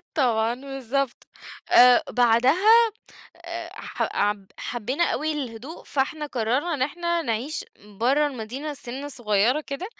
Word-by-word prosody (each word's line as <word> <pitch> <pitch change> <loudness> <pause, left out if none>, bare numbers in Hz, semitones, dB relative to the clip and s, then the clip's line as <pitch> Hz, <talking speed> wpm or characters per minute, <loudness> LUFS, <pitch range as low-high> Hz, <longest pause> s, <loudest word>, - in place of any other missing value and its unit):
طبعًا 235 -6 +2
بالضبط، 270 0 -4 0.4
آآ، 250 0 +7
بعدها 305 - +5 0.5
آآ، 340 0 -7
ح - - -5
عب 205 -1 0
حبينا 250 +7 -1
أوي 310 -1 -1
الهدوء، 265 +1 -7
فإحنا 300 +2 -2
قرّرنا 260 +6 -1
إن 270 - -2
إحنا 340 +4 -1
نعيش 250 +5 -3 0.4
برّه 275 +5 +3
المدينة، 270 +3 -5
سِنّة 270 +2 -7
صغيرة 240 +1 +1
كده، 300 +4 -6
270 Hz, 120 wpm, -24 LUFS, 240-310 Hz, 0.5 s, آآ